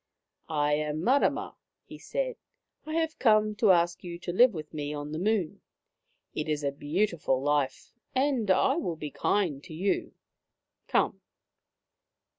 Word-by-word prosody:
I -, -, -5 dB
" -, -, -1 dB
I -, -, +3 dB
am 155 Hz, +1 st, -2 dB
Mamma," 270 Hz, +7 st, +2 dB, 0.3 s
he -, -, -11 dB
said. -, -, -2 dB, 0.3 s
" -, -, -49 dB
I 310 Hz, -, -3 dB
have 325 Hz, -1 st, -1 dB
come 215 Hz, -3 st, +4 dB
to 215 Hz, -1 st, +3 dB
ask 175 Hz, -1 st, +3 dB
you 170 Hz, -1 st, -6 dB
to 175 Hz, 0 st, -5 dB
live 245 Hz, +6 st, +6 dB
with 155 Hz, -5 st, -8 dB
me 150 Hz, -1 st, -3 dB
on 145 Hz, 0 st, -5 dB
the 155 Hz, -, -3 dB
Moon. 200 Hz, -3 st, 0 dB, 0.7 s
It 155 Hz, +1 st, -3 dB
is 150 Hz, -1 st, -1 dB
a 140 Hz, -, +1 dB
beautiful 155 Hz, -1 st, 0 dB
life, 145 Hz, -1 st, -1 dB, 0.2 s
and 260 Hz, -5 st, +1 dB
I 265 Hz, -, +4 dB
will 180 Hz, -, -2 dB
be 150 Hz, -2 st, -6 dB
kind 165 Hz, -8 st, 0 dB
to 160 Hz, -, -10 dB
you. 195 Hz, +5 st, -1 dB, 0.7 s
Come -, -, +1 dB
175 Hz, 165 wpm, -28 LUFS, 150-220 Hz, 0.7 s, live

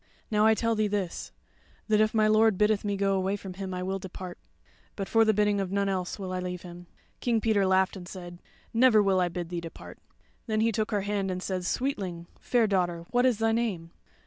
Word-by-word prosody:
Now 210 Hz, 0 st, +4 dB
I 220 Hz, -, +5 dB
tell 230 Hz, +1 st, +1 dB
thee 215 Hz, -1 st, +1 dB
this: 200 Hz, -4 st, -3 dB, 0.6 s
that 215 Hz, -1 st, +3 dB
if 215 Hz, 0 st, +3 dB
my 215 Hz, -1 st, +3 dB
lord 215 Hz, -1 st, +4 dB
biddeth 210 Hz, 0 st, +2 dB
me 205 Hz, -1 st, -1 dB
go 195 Hz, 0 st, +1 dB
from 195 Hz, -2 st, -8 dB
him, 190 Hz, 0 st, -6 dB
I 180 Hz, 0 st, -3 dB
will 190 Hz, +1 st, -2 dB
depart; 185 Hz, -1 st, -8 dB, 0.6 s
but 195 Hz, -2 st, -4 dB
for 225 Hz, 0 st, +4 dB
the 220 Hz, -, +4 dB
bidding 210 Hz, -1 st, +2 dB
of 190 Hz, -1 st, -3 dB
none 200 Hz, 0 st, +1 dB
else 185 Hz, -2 st, -2 dB
will 190 Hz, -2 st, -5 dB
I 185 Hz, -, -2 dB
leave 180 Hz, -1 st, -5 dB
him." 175 Hz, 0 st, -10 dB, 0.3 s
King 235 Hz, -2 st, +1 dB
Peter 210 Hz, -3 st, +2 dB
laughed 190 Hz, +1 st, +2 dB
and 180 Hz, -2 st, -9 dB
said: 175 Hz, -2 st, -9 dB, 0.3 s
"Never 230 Hz, -2 st, +5 dB
will 190 Hz, -2 st, +3 dB
I 180 Hz, -, +1 dB
bid 175 Hz, -1 st, -5 dB
thee 175 Hz, -1 st, -3 dB
depart." 165 Hz, -1 st, -10 dB, 0.5 s
Then 215 Hz, -1 st, +1 dB
he 230 Hz, +1 st, +3 dB
took 215 Hz, 0 st, -1 dB
her 205 Hz, -2 st, 0 dB
hand 200 Hz, -1 st, -1 dB
and 185 Hz, 0 st, -3 dB
said: 185 Hz, -2 st, -3 dB
"Sweetling, 190 Hz, -9 st, -2 dB
fair 240 Hz, -2 st, +2 dB
daughter, 175 Hz, -4 st, 0 dB
what 245 Hz, +1 st, +4 dB
is 245 Hz, -4 st, +2 dB
thy 225 Hz, 0 st, +2 dB
name?" 205 Hz, -8 st, -1 dB
195 Hz, 225 wpm, -28 LUFS, 185-215 Hz, 0.6 s, I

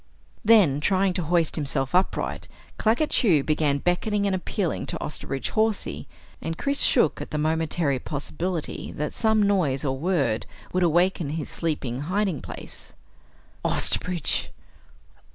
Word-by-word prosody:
Then, 205 Hz, -11 st, +5 dB
trying 190 Hz, +2 st, +2 dB
to 180 Hz, -, -1 dB
hoist 170 Hz, 0 st, +1 dB
himself 135 Hz, -3 st, -1 dB
upright, 185 Hz, +2 st, 0 dB, 0.3 s
Claggett 235 Hz, +8 st, +2 dB
Chew 170 Hz, -, +4 dB
began 150 Hz, -2 st, +1 dB
beckoning 200 Hz, +6 st, 0 dB
and 200 Hz, -, +1 dB
appealing 185 Hz, -1 st, -2 dB
to -, -, -2 dB
Osterbridge 135 Hz, -3 st, -4 dB
Hawsey, 215 Hz, -, -1 dB, 0.3 s
and 165 Hz, 0 st, -4 dB
Chris 280 Hz, 0 st, 0 dB
shook -, -, +4 dB
at -, -, -6 dB
the 150 Hz, -, -3 dB
momentary 155 Hz, -2 st, 0 dB
possibility 160 Hz, +5 st, -4 dB
that 150 Hz, +1 st, -3 dB
some 220 Hz, -2 st, +2 dB
noise 170 Hz, -9 st, +1 dB
or 135 Hz, -1 st, 0 dB
word 140 Hz, -7 st, 0 dB, 0.3 s
would 185 Hz, -, +1 dB
awaken 175 Hz, -1 st, +2 dB
his 155 Hz, 0 st, -4 dB
sleeping 140 Hz, -7 st, -2 dB
hiding 185 Hz, 0 st, -1 dB
place. -, -, -9 dB, 0.7 s
"Osterbridge! 180 Hz, -4 st, 0 dB
165 Hz, 135 wpm, -25 LUFS, 145-190 Hz, 0.7 s, Then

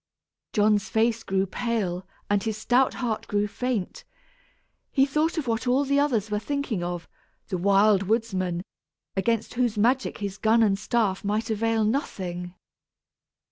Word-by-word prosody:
John's 210 Hz, -1 st, +3 dB
face 225 Hz, +1 st, +2 dB
grew 195 Hz, -2 st, 0 dB
pale 190 Hz, -4 st, -2 dB, 0.2 s
and 205 Hz, -1 st, +2 dB
his 220 Hz, -1 st, -2 dB
stout 245 Hz, +4 st, +2 dB
heart 235 Hz, -4 st, -2 dB
grew 205 Hz, 0 st, +1 dB
faint; 250 Hz, -, -3 dB, 0.9 s
he 270 Hz, -1 st, +3 dB
thought 305 Hz, +4 st, 0 dB
of 310 Hz, -, -1 dB
what 235 Hz, +1 st, -1 dB
all 260 Hz, +3 st, +3 dB
the 280 Hz, +1 st, +2 dB
others 230 Hz, -8 st, +1 dB
were 210 Hz, -, +1 dB
thinking 280 Hz, -7 st, -2 dB
of 175 Hz, -1 st, -4 dB, 0.4 s
the 185 Hz, -, -1 dB
Wild 200 Hz, +1 st, +4 dB
Woodsman, 190 Hz, -6 st, 0 dB, 0.5 s
against 225 Hz, +3 st, 0 dB
whose 240 Hz, -3 st, 0 dB
magic 250 Hz, +5 st, +2 dB
his 200 Hz, -1 st, -5 dB
gun 225 Hz, +1 st, +4 dB
and 200 Hz, -2 st, +2 dB
staff 210 Hz, -4 st, 0 dB
might 210 Hz, +3 st, -1 dB
avail 225 Hz, +1 st, +1 dB
nothing! 185 Hz, -, -2 dB
220 Hz, 145 wpm, -26 LUFS, 195-245 Hz, 0.9 s, Wild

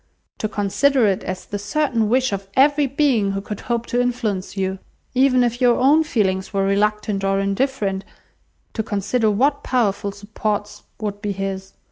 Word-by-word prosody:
To 215 Hz, -, -1 dB
consider 220 Hz, +6 st, +2 dB
it 195 Hz, -2 st, +1 dB
as 185 Hz, 0 st, -5 dB
the 205 Hz, -, -5 dB
certain 230 Hz, 0 st, 0 dB
wish 255 Hz, -1 st, +2 dB
of 195 Hz, 0 st, -4 dB
every 285 Hz, +1 st, +4 dB
being 255 Hz, -8 st, +1 dB
who 195 Hz, -, -2 dB
could 205 Hz, 0 st, -6 dB
hope 235 Hz, -1 st, -2 dB
to 245 Hz, +1 st, 0 dB
influence 215 Hz, -6 st, -2 dB
you! 190 Hz, 0 st, -1 dB, 0.3 s
Even 255 Hz, -1 st, +4 dB
if 240 Hz, +1 st, -1 dB
your 245 Hz, -1 st, +5 dB
own 290 Hz, +5 st, +5 dB
feelings 190 Hz, -10 st, 0 dB
were 195 Hz, -2 st, 0 dB
reluctant 210 Hz, 0 st, 0 dB
or 195 Hz, 0 st, +1 dB
indifferent, 200 Hz, -1 st, -1 dB, 0.7 s
to 220 Hz, -, -1 dB
consider 220 Hz, +2 st, 0 dB
what 275 Hz, +8 st, +2 dB
powerful 205 Hz, -5 st, 0 dB
supports 205 Hz, +1 st, -4 dB, 0.2 s
would 205 Hz, -2 st, -4 dB
be 205 Hz, -2 st, -2 dB
his! 195 Hz, 0 st, -5 dB
210 Hz, 165 wpm, -21 LUFS, 195-250 Hz, 0.7 s, your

